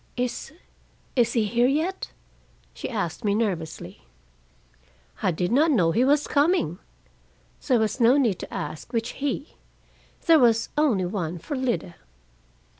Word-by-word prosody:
"Is 250 Hz, +2 st, -3 dB, 0.6 s
is 240 Hz, -3 st, +2 dB
he 225 Hz, -3 st, +2 dB
here 240 Hz, +4 st, +2 dB
yet?" 320 Hz, +8 st, -1 dB, 0.6 s
she -, -, -6 dB
asked 205 Hz, -4 st, -3 dB
me 205 Hz, -1 st, +1 dB
nervously. 165 Hz, -, -3 dB, 1.2 s
"I -, -, +2 dB
did 175 Hz, +2 st, -1 dB
not 295 Hz, +7 st, +4 dB
know 180 Hz, -, +3 dB
he 230 Hz, +8 st, +2 dB
was 290 Hz, +2 st, +3 dB
coming." 285 Hz, -, +1 dB, 0.9 s
There 255 Hz, -4 st, +4 dB
was 220 Hz, +2 st, -1 dB
no 245 Hz, +3 st, +5 dB
need 230 Hz, -10 st, +1 dB
to -, -, -8 dB
ask 155 Hz, -, -6 dB
which 230 Hz, -1 st, -1 dB
"he." 285 Hz, +1 st, -4 dB, 0.7 s
There 330 Hz, -2 st, +6 dB
was 230 Hz, -3 st, +3 dB
only 260 Hz, -12 st, +2 dB
one 175 Hz, -3 st, -3 dB
for 285 Hz, -, -5 dB
Lida. 245 Hz, -9 st, -2 dB
235 Hz, 140 wpm, -25 LUFS, 185-275 Hz, 1.2 s, There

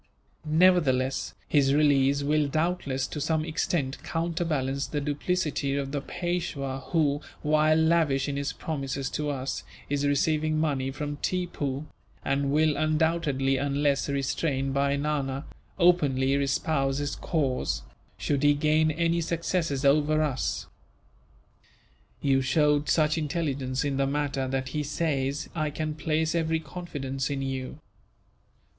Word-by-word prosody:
Nevertheless, 155 Hz, -6 st, +3 dB
his 140 Hz, -2 st, +3 dB
release 140 Hz, -1 st, +3 dB
will 150 Hz, 0 st, +2 dB
doubtless, 150 Hz, -4 st, -1 dB
to 150 Hz, -, -5 dB
some 155 Hz, +1 st, 0 dB
extent, 155 Hz, -3 st, -1 dB
counterbalance 160 Hz, -5 st, -1 dB
the 150 Hz, -, -2 dB
duplicity 145 Hz, -1 st, -1 dB
of 135 Hz, -1 st, -3 dB
the 145 Hz, -1 st, -2 dB
Peishwa 165 Hz, -6 st, -3 dB
who, 145 Hz, -3 st, +2 dB, 0.2 s
while 155 Hz, +1 st, +4 dB
lavish 160 Hz, -4 st, +2 dB
in 140 Hz, -, -2 dB
his 140 Hz, +1 st, -2 dB
promises 135 Hz, -3 st, -4 dB
to 150 Hz, -1 st, -2 dB
us, 135 Hz, -1 st, -3 dB, 0.3 s
is 145 Hz, 0 st, 0 dB
receiving 155 Hz, +2 st, +1 dB
money 140 Hz, -4 st, 0 dB
from 145 Hz, +1 st, -4 dB
Tippoo; 150 Hz, -6 st, -2 dB, 0.4 s
and 140 Hz, 0 st, +1 dB
will 155 Hz, 0 st, +3 dB
undoubtedly, 155 Hz, -4 st, +1 dB
unless 140 Hz, +1 st, +1 dB
restrained 135 Hz, 0 st, -1 dB
by 140 Hz, 0 st, +2 dB
Nana, 140 Hz, -1 st, -2 dB, 0.3 s
openly 145 Hz, -7 st, +3 dB
espouse 140 Hz, 0 st, +1 dB
his 145 Hz, 0 st, -2 dB
cause, 140 Hz, -6 st, -1 dB, 0.3 s
should 140 Hz, -2 st, 0 dB
he 145 Hz, 0 st, +5 dB
gain 155 Hz, +2 st, +3 dB
any 170 Hz, +2 st, +1 dB
successes 165 Hz, -3 st, -1 dB
over 155 Hz, +2 st, +4 dB
us. 135 Hz, -4 st, -1 dB, 1.6 s
You 135 Hz, -1 st, +3 dB
showed 150 Hz, +1 st, +2 dB
such 155 Hz, 0 st, +3 dB
intelligence 140 Hz, -4 st, -2 dB
in 140 Hz, -2 st, -1 dB
the 135 Hz, 0 st, +2 dB
matter 140 Hz, -2 st, -1 dB
that 130 Hz, 0 st, -2 dB
he 150 Hz, +3 st, -2 dB
says 145 Hz, -2 st, -1 dB
I 155 Hz, -3 st, -1 dB
can 155 Hz, +1 st, -3 dB
place 155 Hz, +1 st, 0 dB
every 160 Hz, -1 st, +1 dB
confidence 140 Hz, -6 st, -4 dB
in 140 Hz, -1 st, -2 dB
you. 135 Hz, 0 st, -4 dB
145 Hz, 130 wpm, -27 LUFS, 135-155 Hz, 1.6 s, he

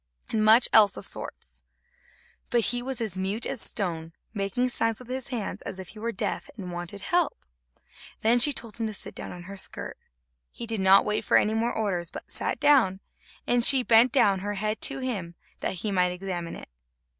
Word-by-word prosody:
and 215 Hz, -1 st, +1 dB
much 220 Hz, +3 st, +6 dB
else 205 Hz, -3 st, +7 dB
of -, -, -6 dB
all -, -, -13 dB
sorts; -, -, -4 dB, 0.9 s
but 240 Hz, -2 st, +2 dB
he 245 Hz, 0 st, -2 dB
was 260 Hz, 0 st, -4 dB
as 220 Hz, -5 st, -2 dB
mute 195 Hz, +4 st, -3 dB
as 245 Hz, -, -1 dB
a -, -, +1 dB
stone, 165 Hz, -5 st, -2 dB, 0.2 s
making 210 Hz, +5 st, -1 dB
signs 225 Hz, -2 st, +1 dB
with 250 Hz, -, -6 dB
his 260 Hz, 0 st, -3 dB
hands, 240 Hz, -6 st, -4 dB
as -, -, -7 dB
if 190 Hz, -2 st, -8 dB
he 215 Hz, -, -12 dB
were 230 Hz, +2 st, -2 dB
deaf 210 Hz, -1 st, -3 dB
and 185 Hz, -4 st, -7 dB
wanted 175 Hz, +3 st, -6 dB
help. 345 Hz, -, 0 dB, 0.8 s
Then 235 Hz, +2 st, +4 dB
she 290 Hz, +5 st, +6 dB
told 230 Hz, -5 st, -6 dB
him 225 Hz, -, -1 dB
to 215 Hz, -, -5 dB
sit -, -, -7 dB
down -, -, -7 dB
on 175 Hz, 0 st, -9 dB
her 195 Hz, +3 st, -9 dB
skirt. -, -, -3 dB, 0.5 s
He 235 Hz, -, -7 dB
did 225 Hz, -2 st, -3 dB
not 190 Hz, +1 st, +6 dB
wait 210 Hz, 0 st, -1 dB
for -, -, +4 dB
any 215 Hz, -, +2 dB
more 230 Hz, +2 st, 0 dB
orders, 180 Hz, -6 st, -2 dB
but -, -, -10 dB
sat -, -, -2 dB
down, 265 Hz, -11 st, +4 dB, 0.5 s
and 245 Hz, -1 st, +2 dB
she 265 Hz, 0 st, +7 dB
bent 235 Hz, +1 st, +6 dB
down 200 Hz, -7 st, +3 dB
her 205 Hz, +2 st, -4 dB
head 215 Hz, +2 st, -2 dB
to 270 Hz, -1 st, +3 dB
him, 195 Hz, -10 st, -4 dB, 0.2 s
that -, -, -2 dB
he 210 Hz, -, 0 dB
might 180 Hz, -2 st, +2 dB
examine 180 Hz, -2 st, -5 dB
it. -, -, -10 dB
215 Hz, 215 wpm, -26 LUFS, 190-240 Hz, 0.9 s, else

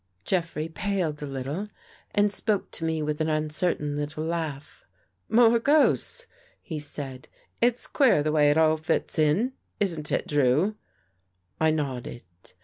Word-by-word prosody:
Jeffrey 165 Hz, -4 st, 0 dB
paled 165 Hz, -3 st, -2 dB
a 145 Hz, -, -4 dB
little 140 Hz, +9 st, -4 dB, 0.5 s
and 205 Hz, 0 st, +3 dB
spoke 210 Hz, -2 st, -1 dB
to -, -, -2 dB
me 160 Hz, -1 st, -1 dB
with 150 Hz, +1 st, -2 dB
an 155 Hz, -, +1 dB
uncertain 155 Hz, -1 st, 0 dB
little 150 Hz, +1 st, -3 dB
laugh. 160 Hz, -4 st, -4 dB, 0.2 s
" 90 Hz, -1 st, -47 dB
More 235 Hz, 0 st, +5 dB
ghosts! 310 Hz, -, +3 dB, 0.2 s
" -, -, -31 dB
he 160 Hz, -5 st, -5 dB
said. 140 Hz, -3 st, -5 dB, 0.2 s
" -, -, -43 dB
It's 240 Hz, +1 st, +2 dB
queer 245 Hz, -, +3 dB
the 155 Hz, -, 0 dB
way 150 Hz, -1 st, +4 dB
it 145 Hz, -, +3 dB
all 160 Hz, 0 st, +4 dB
fits 160 Hz, +1 st, 0 dB
in, 180 Hz, -, +2 dB, 0.3 s
isn't 165 Hz, -7 st, -1 dB
it. -, -, 0 dB
Drew?" 145 Hz, +8 st, +2 dB, 0.8 s
I 160 Hz, -, +4 dB
nodded. 135 Hz, -6 st, -3 dB
155 Hz, 155 wpm, -26 LUFS, 150-195 Hz, 0.8 s, More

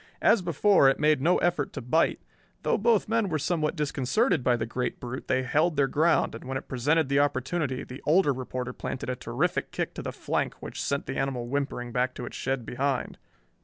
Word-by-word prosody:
As 230 Hz, -, +5 dB
before, 175 Hz, -2 st, +4 dB
it 135 Hz, -, 0 dB
made 150 Hz, -2 st, +3 dB
no 170 Hz, +5 st, +4 dB
effort 175 Hz, -5 st, 0 dB
to -, -, -4 dB
bite. 155 Hz, +8 st, +2 dB, 0.4 s
Though -, -, +1 dB
both 225 Hz, -1 st, +3 dB
men 225 Hz, -2 st, +1 dB
were 160 Hz, -, 0 dB
somewhat 155 Hz, +1 st, 0 dB
disconcerted 150 Hz, -, +1 dB
by 120 Hz, -1 st, +3 dB
the 110 Hz, -, -2 dB
great 125 Hz, +2 st, -3 dB
brute 125 Hz, +1 st, -6 dB
they 130 Hz, 0 st, +1 dB
held 155 Hz, +6 st, +1 dB
their 140 Hz, -1 st, +3 dB
ground, 160 Hz, +5 st, +2 dB
and -, -, -8 dB
when 130 Hz, +1 st, -3 dB
it 130 Hz, -, -8 dB
presented 145 Hz, +4 st, +1 dB
the 140 Hz, +1 st, +2 dB
opportunity 140 Hz, 0 st, 0 dB
the 130 Hz, +2 st, -9 dB
older 155 Hz, -2 st, +4 dB
reporter 125 Hz, -1 st, -5 dB
planted 130 Hz, 0 st, -4 dB
a -, -, -2 dB
terrific 125 Hz, +8 st, -1 dB
kick -, -, -3 dB
to -, -, -6 dB
the -, -, -4 dB
flank -, -, -2 dB
which -, -, -6 dB
sent 140 Hz, 0 st, -1 dB
the 135 Hz, -, -4 dB
animal 130 Hz, -3 st, -1 dB
whimpering 130 Hz, -2 st, -2 dB
back 125 Hz, +1 st, 0 dB
to 125 Hz, -, -5 dB
its -, -, -8 dB
shed 135 Hz, -3 st, -2 dB
behind. 135 Hz, +2 st, -2 dB
140 Hz, 210 wpm, -27 LUFS, 130-160 Hz, 0.4 s, As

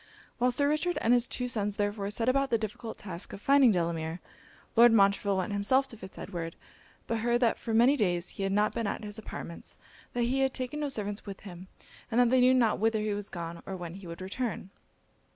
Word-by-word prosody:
While 250 Hz, +1 st, +3 dB
Sir 285 Hz, +3 st, +3 dB
Richard 305 Hz, +4 st, 0 dB
and 230 Hz, -, +3 dB
his 245 Hz, -1 st, +3 dB
two 250 Hz, -, -3 dB
sons 210 Hz, -4 st, -1 dB
therefore 205 Hz, -1 st, -1 dB
set 225 Hz, +3 st, -2 dB
about 275 Hz, +1 st, +2 dB
the 235 Hz, -, +3 dB
difficult 220 Hz, +1 st, -6 dB
task 185 Hz, -3 st, -5 dB
of -, -, -7 dB
finding 275 Hz, +1 st, +5 dB
Delamere, 165 Hz, -2 st, -1 dB, 0.6 s
Lord 240 Hz, +1 st, +8 dB
Montreville 200 Hz, -2 st, +3 dB
went 190 Hz, +2 st, -2 dB
himself 260 Hz, +7 st, +2 dB
to -, -, -7 dB
Fitz 190 Hz, -3 st, -11 dB
Edward; 170 Hz, -3 st, -5 dB, 0.5 s
but 230 Hz, -1 st, -1 dB
heard 240 Hz, +1 st, +2 dB
that 235 Hz, -2 st, +2 dB
for 230 Hz, -, -5 dB
many 240 Hz, +5 st, +5 dB
days 180 Hz, -7 st, 0 dB
he -, -, -8 dB
had 195 Hz, 0 st, 0 dB
not 210 Hz, +2 st, +2 dB
been 230 Hz, -3 st, -2 dB
at 200 Hz, -, -3 dB
his 210 Hz, +1 st, -6 dB
apartments, 170 Hz, -5 st, -8 dB, 0.4 s
that 245 Hz, -, 0 dB
he 255 Hz, +3 st, +1 dB
had 265 Hz, -1 st, +1 dB
taken 255 Hz, +4 st, -3 dB
no 295 Hz, -1 st, -1 dB
servants 205 Hz, -4 st, -4 dB
with 195 Hz, -1 st, -7 dB
him, 185 Hz, -2 st, -10 dB, 0.4 s
and 235 Hz, 0 st, +1 dB
that 245 Hz, -1 st, +4 dB
they 260 Hz, -1 st, +5 dB
knew 255 Hz, +1 st, +6 dB
not 235 Hz, -4 st, +3 dB
whither 220 Hz, +1 st, +2 dB
he 210 Hz, -1 st, -1 dB
was 205 Hz, 0 st, -4 dB
gone, 170 Hz, -1 st, -6 dB
or 195 Hz, -, -4 dB
when 175 Hz, -2 st, -6 dB
he 190 Hz, -1 st, -10 dB
would 170 Hz, +2 st, -8 dB
return. 195 Hz, 0 st, -4 dB
215 Hz, 225 wpm, -29 LUFS, 195-245 Hz, 0.6 s, Lord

